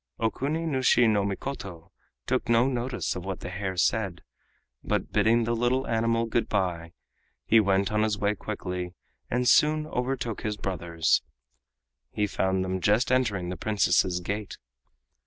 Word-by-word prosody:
Okuni 140 +8 -1
nushi 130 -4 +3
no 105 -2 +2
Mikoto 95 -4 -5 0.3
took 130 -1 -1
no 115 +1 +4
notice 125 -1 -2
of 90 - -5
what 95 -1 -5
the 90 - -6
hare 95 -1 -4
said, 95 -1 0 0.6
but - - -1
bidding 110 +3 +3
the 115 +1 0
little 120 +3 +1
animal 115 0 +1
goodby, 90 -7 -1 0.6
went 100 -3 +4
on 105 0 +1
his 110 -1 +1
way 100 +1 +1
quickly 90 -4 -5 0.3
and 125 +1 0
soon 155 +3 +4
overtook 125 -5 -3
his 105 -1 -3
brothers. 85 -5 0 0.9
He 105 - -1
found 95 -2 0
them 95 0 -2
just 110 +6 +2
entering 105 -9 +1
the 90 - -3
Princess's 95 -4 +1
gate. 105 +2 -4
105 Hz, 140 wpm, -27 LUFS, 95-120 Hz, 0.9 s, no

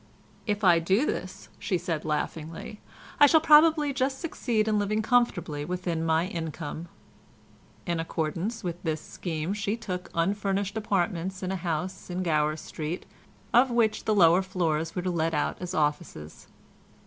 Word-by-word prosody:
"If 210 0 -1
I 175 -3 +6
do 190 - +2
this," - - -4
she 185 - 0
said 170 -3 -3
laughingly, 160 +5 -4 0.4
"I 290 - +9
shall 320 +3 +6
probably 305 -1 +5
just 265 0 -1
succeed 235 -9 -1
in 215 -1 +2
living 215 +2 0
comfortably 180 -11 +1
within 175 -1 -2
my 160 +1 +2
income." 165 -2 -5 1.0
In 170 -1 -1
accordance 165 +7 -3
with 175 -1 -4
this 160 -2 -1
scheme 165 +2 -4
she 210 +1 -2
took 180 -5 -5
unfurnished 195 +3 0
apartments 190 -3 -1
in 185 - -2
a - - -1
house 180 +2 -3
in 180 +1 -2
Gower 155 -2 +1
Street, 155 +2 -5 0.5
of 255 +2 +6
which 235 -3 +1
the 215 - +2
lower 175 -1 +6
floors 165 -4 -1
were 180 - -2
let 165 -3 0
out 150 - -1
as 180 - -4
offices. 150 - -2
180 Hz, 150 wpm, -27 LUFS, 165-210 Hz, 1.0 s, I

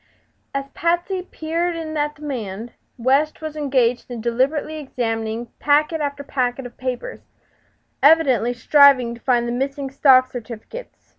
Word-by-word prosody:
As 275 0 -1
Patsy 345 +3 0
peered 335 0 -3
in 315 -1 -5
at 295 0 -1
the 300 - -15
man 230 -5 -5 0.3
West 270 +5 +1
was 310 -1 -6
engaged 255 -5 0
in 240 -2 -5
deliberately 265 +7 0
examining 230 -4 -3
packet 300 +2 +2
after 285 -1 -3
packet 255 -1 -2
of 245 - -10
papers, 255 - -5 0.8
evidently 275 -6 +4
striving 255 0 +5
to 235 - -12
find 240 -2 +1
the - - -2
missing 270 +2 -3
stock 260 -2 +5
certificates. 245 - -9
270 Hz, 140 wpm, -21 LUFS, 240-305 Hz, 0.8 s, striving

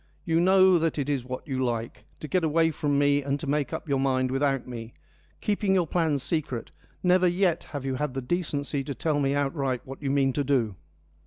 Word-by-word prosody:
You 165 0 +2
know 185 0 +5
that 165 -1 0
is 140 -2 -1
what 130 +4 -7
you 130 -2 -1
like, 115 -1 -3 0.2
to 155 - -5
get 180 +5 +1
away 160 +1 +3
from 145 -2 0
me 145 0 +3
and 140 +1 -2
to 155 - -5
make 145 0 0
up - - -5
your 140 -2 +1
mind 130 -1 +1
without 135 -1 0
me, 115 -2 -8 0.5
keeping 205 -2 +1
your 180 -2 +3
plans 155 -4 0
secret: 145 -8 -3 0.3
never 180 0 +4
yet 175 -1 +1
have 145 -3 -6
you 135 - -1
had 135 0 -2
the 135 - -2
decency 145 -2 -2
to 140 - -4
tell 155 -3 0
me 140 0 +1
outright 135 -3 -1
what 135 +2 -9
you 140 - -2
mean 135 -1 +2
to 145 - 0
do. 125 -6 +1
145 Hz, 215 wpm, -27 LUFS, 135-165 Hz, 0.5 s, know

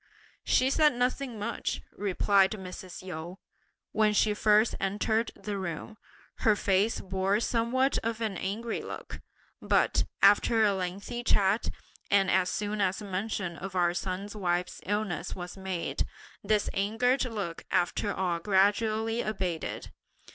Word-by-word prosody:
"She 260 +1 +3
said 300 -1 +4
nothing 250 0 -1
much," 210 +3 -3
replied 195 0 +3
Mrs. 185 -2 -8
Yu. 175 0 -6 0.5
"When 215 -1 +3
she 210 0 +3
first 215 +1 +4
entered 220 +3 0
the 205 -2 -4
room, 185 +4 -5 0.4
her 215 -2 +3
face 200 +2 +1
bore 190 +2 0
somewhat 240 +4 +1
of 225 0 -3
an 220 -4 -2
angry 220 +6 -3
look, - - -8 0.4
but, - - +2 0.2
after 220 +3 +5
a 205 -2 +4
lengthy 195 +6 -4
chat 200 0 +2 0.4
and 195 -1 +4
as 185 -1 +3
soon 210 0 -2
as 195 -1 +1
mention 190 -2 -3
of 190 +3 -7
our 175 -1 +3
son's 185 +3 -4
wife's 175 -3 -1
illness 205 -2 -2
was 180 -1 -7
made, 190 -3 -3 0.4
this 210 0 +2
angered 225 +6 +1
look 205 -8 -4
after 190 +3 +1
all 180 -3 -1
gradually 215 +4 +2
abated. 185 -6 -3
200 Hz, 135 wpm, -29 LUFS, 185-220 Hz, 0.5 s, after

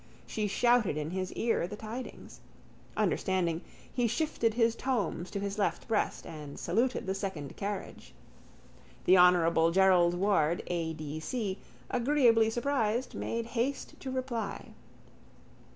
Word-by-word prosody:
She 215 -1 -2
shouted 235 -5 +3
in 155 +1 -3
his 185 0 -3
ear 225 -6 0
the 205 - -6
tidings. 225 +4 -8 0.6
Understanding, 175 -3 +1 0.3
he 245 -2 +2
shifted 230 -4 0
his 230 -1 +3
tomes 205 -10 -1
to 200 - -4
his 200 +1 -3
left 200 - 0
breast 220 -2 0
and 150 -3 -8
saluted 250 +3 0
the 190 - -1
second 190 -8 -5
carriage. 200 0 -6 0.9
The 185 0 +6
honourable 170 -2 +5
Gerald 180 -1 +4
Ward 175 -4 +2
A. 165 -2 -2
D. 155 -1 -5
C., 200 +2 -3 0.3
agreeably 240 -3 +4
surprised, 240 -1 0
made 230 0 -3
haste 245 +4 -2
to 265 - -6
reply. 255 -5 -3
205 Hz, 130 wpm, -30 LUFS, 175-235 Hz, 0.9 s, The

